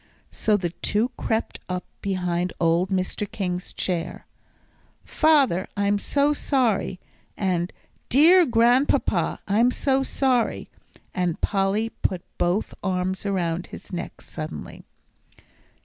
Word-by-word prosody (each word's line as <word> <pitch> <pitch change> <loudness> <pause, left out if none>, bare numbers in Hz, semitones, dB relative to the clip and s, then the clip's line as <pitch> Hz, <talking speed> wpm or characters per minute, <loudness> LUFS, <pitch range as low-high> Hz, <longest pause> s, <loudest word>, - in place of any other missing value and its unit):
So 215 -1 +2
the 175 -4 -2
two 215 +6 0
crept 225 -2 -2
up 180 0 -3 0.2
behind 180 -2 -1
old 170 +3 +2
Mr. 190 +1 -2
King's 180 -3 -3
chair: 175 -3 -2 0.8
"Father, 280 - +3
I'm 200 0 +2
so 285 +6 +2
sorry," 240 -10 0 0.4
and 180 -2 0 0.4
"Dear 335 +6 +6
Grandpapa, 240 +4 +2
I'm 220 +5 +4
so 270 +1 +1
sorry," 260 -3 0 0.4
and 180 -3 -1
Polly 200 +3 +1
put 185 -5 -3 0.2
both 180 +5 0
arms 185 +1 -1
around 175 -3 -1
his - - -11
neck 175 - -5
suddenly. 155 0 -7
195 Hz, 110 wpm, -24 LUFS, 180-240 Hz, 0.8 s, Dear